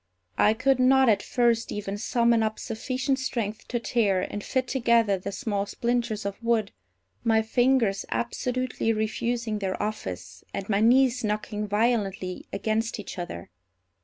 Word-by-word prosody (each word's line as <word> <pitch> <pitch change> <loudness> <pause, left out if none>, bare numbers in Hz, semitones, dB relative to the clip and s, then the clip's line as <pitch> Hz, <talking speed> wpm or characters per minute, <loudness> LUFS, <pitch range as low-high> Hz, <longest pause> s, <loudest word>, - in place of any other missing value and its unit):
I 215 +1 +5
could 260 +2 +2
not, 265 0 +5
at 205 -3 +3
first, 235 -2 +1
even 200 -1 -4
summon 235 +2 +2
up 220 0 -1
sufficient 260 +4 -2
strength 225 -5 -3
to 240 - -1
tear 205 -6 +1
and 205 - -5
fit 260 -1 -1
together 230 -6 +2
the 200 +2 -5
small 205 -3 -2
splinters 235 -3 -1
of 200 +2 -4
wood, 230 -3 +1 0.5
my 220 -1 +3
fingers 240 -3 +2
absolutely 250 -1 -1
refusing 220 +1 -1
their 190 -2 -2
office, 95 - -5
and 195 - -4
my 200 -2 +1
knees 250 +2 +4
knocking 210 0 -2
violently 205 -4 -1
against 220 +2 -1
each 200 - -7
other. 85 - -6
225 Hz, 145 wpm, -26 LUFS, 205-240 Hz, 0.5 s, I